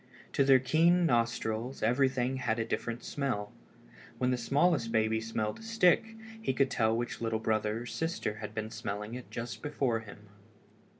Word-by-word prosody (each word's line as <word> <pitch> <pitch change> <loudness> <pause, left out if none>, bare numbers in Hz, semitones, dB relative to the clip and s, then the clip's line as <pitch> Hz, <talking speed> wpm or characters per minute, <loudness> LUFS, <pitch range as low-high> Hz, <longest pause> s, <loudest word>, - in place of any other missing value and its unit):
To 140 - +4
their 135 -1 +7
keen 165 +7 +3
nostrils 115 -1 0
everything 130 +2 +2
had 115 -3 0
a 115 - -1
different 120 +1 -3
smell. 125 -8 -2 0.7
When 125 0 +1
the - - +2
smallest 140 0 +2
baby 110 0 +2
smelled 110 -1 -2
a - - -12
stick 225 -1 +2 0.3
he 175 - 0
could 135 0 +2
tell 110 -1 +2
which 120 0 -4
little 115 -1 0
brother 110 0 0
or - - -9
sister 160 -5 -2
had 105 -1 -7
been 110 0 -3
smelling 105 +2 -5
it 125 0 -7
just 120 +1 -5
before 135 -6 0
him. 105 -1 -13
120 Hz, 170 wpm, -31 LUFS, 110-135 Hz, 0.7 s, their